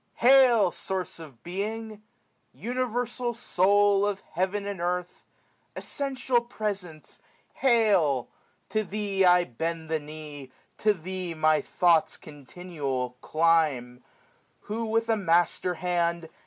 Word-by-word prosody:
Hail, 245 Hz, -6 st, +5 dB
Source 185 Hz, -2 st, -4 dB
of 140 Hz, -8 st, -13 dB
Being! 215 Hz, +4 st, -5 dB, 0.5 s
Universal 245 Hz, 0 st, -2 dB
Soul 200 Hz, -1 st, +3 dB
Of 205 Hz, -1 st, -1 dB
heaven 190 Hz, +4 st, -1 dB
and 200 Hz, -3 st, -5 dB
earth! 180 Hz, 0 st, -3 dB, 0.5 s
Essential 265 Hz, -3 st, -1 dB
Presence, 200 Hz, -9 st, -5 dB, 0.3 s
hail! 200 Hz, -, +3 dB, 0.4 s
To 215 Hz, 0 st, 0 dB
The* 200 Hz, -1 st, 0 dB
I 180 Hz, 0 st, +6 dB
bend 160 Hz, +4 st, -4 dB
the 160 Hz, -, +1 dB
knee; 150 Hz, -2 st, -9 dB, 0.3 s
to 210 Hz, -1 st, +3 dB
Thee 180 Hz, 0 st, -5 dB
my 155 Hz, 0 st, +3 dB
thoughts, 170 Hz, -3 st, +2 dB
SSS -, -, -10 dB
Continual, 145 Hz, -3 st, -5 dB
climb; 155 Hz, -7 st, +1 dB, 0.6 s
who, 225 Hz, +2 st, -4 dB
with 225 Hz, +1 st, 0 dB
a 225 Hz, -, +3 dB
master 175 Hz, -1 st, +1 dB
hand. 170 Hz, -1 st, -1 dB
180 Hz, 115 wpm, -27 LUFS, 160-215 Hz, 0.6 s, I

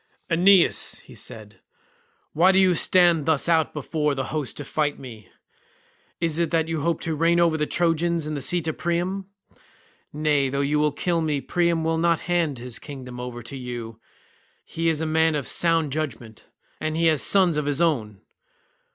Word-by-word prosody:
"Aeneas," 180 Hz, +2 st, +3 dB
said 110 Hz, -4 st, -9 dB
he, -, -, -28 dB, 0.7 s
"why 180 Hz, +5 st, +5 dB
do 190 Hz, -, +2 dB
you 190 Hz, -1 st, +5 dB
stand 170 Hz, -2 st, +3 dB
thus 160 Hz, -2 st, +2 dB
out 165 Hz, -2 st, +2 dB
before 150 Hz, 0 st, -2 dB
the 135 Hz, -, -2 dB
host 150 Hz, -4 st, -3 dB
to 145 Hz, -, -6 dB
fight 145 Hz, 0 st, -1 dB
me? 115 Hz, -7 st, -11 dB, 0.9 s
Is 165 Hz, -1 st, -1 dB
it 170 Hz, -, +1 dB
that 165 Hz, -1 st, 0 dB
you 165 Hz, -2 st, -2 dB
hope 170 Hz, +3 st, -1 dB
to 165 Hz, -, -2 dB
reign 165 Hz, +2 st, +2 dB
over 170 Hz, -2 st, +3 dB
the 150 Hz, -1 st, -1 dB
Trojans 170 Hz, -1 st, 0 dB
in 155 Hz, -, -4 dB
the 145 Hz, -, -4 dB
seat 170 Hz, +3 st, 0 dB
of 160 Hz, -, -3 dB
Priam? 180 Hz, +3 st, -2 dB, 0.8 s
Nay, 150 Hz, -2 st, +1 dB
though 140 Hz, +1 st, -1 dB
you 150 Hz, +1 st, +1 dB
kill 170 Hz, +2 st, -1 dB
me 150 Hz, -3 st, -1 dB
Priam 170 Hz, +2 st, 0 dB
will 160 Hz, 0 st, 0 dB
not 170 Hz, -1 st, +2 dB
hand 170 Hz, -6 st, -1 dB
his 120 Hz, 0 st, -7 dB
kingdom 130 Hz, -4 st, -9 dB
over 125 Hz, -1 st, -7 dB
to 120 Hz, +5 st, -8 dB
you. 120 Hz, -3 st, -7 dB, 0.7 s
He 165 Hz, 0 st, -1 dB
is 160 Hz, -1 st, -1 dB
a -, -, -1 dB
man 160 Hz, 0 st, +2 dB
of 145 Hz, -3 st, -3 dB
sound 165 Hz, -3 st, +1 dB
judgement, 120 Hz, -7 st, -6 dB, 0.3 s
and 155 Hz, 0 st, -3 dB
he 165 Hz, -, +1 dB
has 155 Hz, -3 st, +3 dB
sons 185 Hz, -5 st, +4 dB
of 150 Hz, -1 st, -2 dB
his 145 Hz, 0 st, 0 dB
own. 115 Hz, -, 0 dB
155 Hz, 185 wpm, -24 LUFS, 140-170 Hz, 0.9 s, why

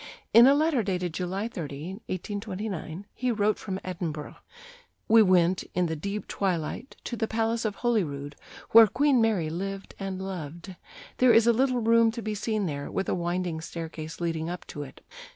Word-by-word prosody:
In 235 Hz, +2 st, +9 dB
a 275 Hz, -, +6 dB
letter 305 Hz, -4 st, +2 dB
dated 180 Hz, -4 st, -2 dB
July 190 Hz, +5 st, -2 dB
30, 170 Hz, -, -6 dB
1829, 195 Hz, -2 st, -5 dB
he 250 Hz, -1 st, -1 dB
wrote 215 Hz, -1 st, +1 dB
from 190 Hz, -2 st, -4 dB
Edinburgh: 160 Hz, -5 st, -5 dB, 0.7 s
"We 225 Hz, 0 st, +7 dB
went, 185 Hz, -2 st, +4 dB
in 180 Hz, 0 st, +2 dB
the 160 Hz, -1 st, -2 dB
deep 200 Hz, +7 st, -4 dB
twilight, 190 Hz, -, -2 dB
to 240 Hz, -, -4 dB
the 225 Hz, -1 st, -1 dB
Palace 225 Hz, +1 st, 0 dB
of 210 Hz, -2 st, -1 dB
Holyrood, 150 Hz, -, -1 dB, 0.4 s
where 225 Hz, 0 st, +9 dB
Queen 265 Hz, +3 st, +3 dB
Mary 200 Hz, -9 st, +1 dB
lived 195 Hz, +3 st, -5 dB
and 195 Hz, -1 st, -4 dB
loved. 180 Hz, -1 st, -6 dB, 0.4 s
There 255 Hz, -1 st, +6 dB
is 225 Hz, 0 st, +6 dB
a 235 Hz, -, +5 dB
little 255 Hz, +1 st, +1 dB
room 230 Hz, 0 st, +5 dB
to 230 Hz, -1 st, -6 dB
be 215 Hz, +1 st, -2 dB
seen 210 Hz, 0 st, -1 dB
there, 140 Hz, -4 st, -4 dB
with 195 Hz, -, -2 dB
a -, -, +1 dB
winding 175 Hz, -2 st, -2 dB
staircase 160 Hz, -1 st, -7 dB
leading 165 Hz, -1 st, -2 dB
up 180 Hz, 0 st, -6 dB
to 145 Hz, -, -5 dB
it. 140 Hz, -, -10 dB
195 Hz, 175 wpm, -27 LUFS, 170-225 Hz, 0.7 s, In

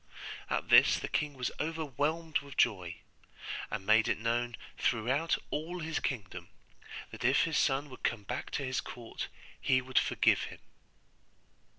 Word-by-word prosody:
At -, -, -1 dB
this -, -, +8 dB
the -, -, -4 dB
king 150 Hz, -1 st, -1 dB
was 125 Hz, -2 st, -2 dB
overwhelmed 160 Hz, +1 st, -1 dB
with 140 Hz, -1 st, -11 dB
joy, 90 Hz, -8 st, +2 dB, 0.7 s
and 95 Hz, -, -4 dB
made 110 Hz, +1 st, +5 dB
it -, -, +1 dB
known 120 Hz, +1 st, 0 dB, 0.2 s
throughout 130 Hz, +8 st, +1 dB
all 165 Hz, +4 st, -3 dB
his 160 Hz, -1 st, -2 dB
kingdom, 95 Hz, -, -4 dB, 0.6 s
that -, -, -8 dB
if 130 Hz, +4 st, +5 dB
his 160 Hz, -2 st, +1 dB
son 135 Hz, +2 st, +2 dB
would 130 Hz, -, -11 dB
come 115 Hz, -3 st, -1 dB
back 125 Hz, +6 st, -4 dB
to 140 Hz, -, -1 dB
his 130 Hz, 0 st, -1 dB
court 115 Hz, -2 st, -6 dB, 0.3 s
he 130 Hz, -1 st, +4 dB
would 130 Hz, 0 st, +2 dB
forgive -, -, +3 dB
him. -, -, -9 dB
130 Hz, 155 wpm, -32 LUFS, 115-150 Hz, 0.7 s, this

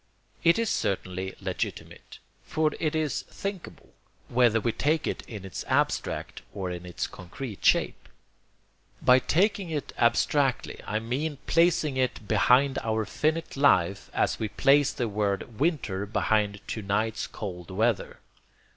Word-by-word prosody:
It 170 Hz, +4 st, +5 dB
is 230 Hz, -2 st, 0 dB
certainly 95 Hz, 0 st, -2 dB
legitimate, 95 Hz, -2 st, -5 dB, 0.3 s
for 155 Hz, -1 st, 0 dB
it 155 Hz, -1 st, 0 dB
is 155 Hz, -2 st, 0 dB
thinkable, 195 Hz, -2 st, -7 dB, 0.4 s
whether 120 Hz, -2 st, +4 dB
we 115 Hz, +1 st, 0 dB
take 155 Hz, +6 st, 0 dB
it -, -, -2 dB
in 105 Hz, -4 st, -8 dB
its 95 Hz, -, -6 dB
abstract -, -, -1 dB
or 95 Hz, -2 st, -3 dB
in 90 Hz, 0 st, -6 dB
its 90 Hz, -3 st, -3 dB
concrete 100 Hz, +5 st, -8 dB
shape. -, -, +2 dB, 0.9 s
By 125 Hz, +1 st, +6 dB
taking 195 Hz, +5 st, +1 dB
it 150 Hz, -3 st, -4 dB
abstractly 130 Hz, +3 st, +2 dB
I 110 Hz, -, 0 dB
mean 135 Hz, +7 st, -2 dB
placing 165 Hz, -4 st, +3 dB
it 125 Hz, -5 st, -1 dB
behind 135 Hz, +5 st, +4 dB
our 110 Hz, -1 st, -1 dB
finite 160 Hz, +7 st, -1 dB
life 100 Hz, -9 st, +3 dB
as -, -, 0 dB
we 110 Hz, -, -1 dB
place 140 Hz, +5 st, +4 dB
the 120 Hz, -, -2 dB
word 105 Hz, +1 st, -2 dB
'winter' 120 Hz, -, 0 dB
behind 105 Hz, -1 st, +1 dB
to 110 Hz, -, -3 dB
night's 105 Hz, +3 st, -1 dB
cold 90 Hz, -5 st, -7 dB
weather. 110 Hz, +3 st, 0 dB
115 Hz, 140 wpm, -27 LUFS, 100-150 Hz, 0.9 s, By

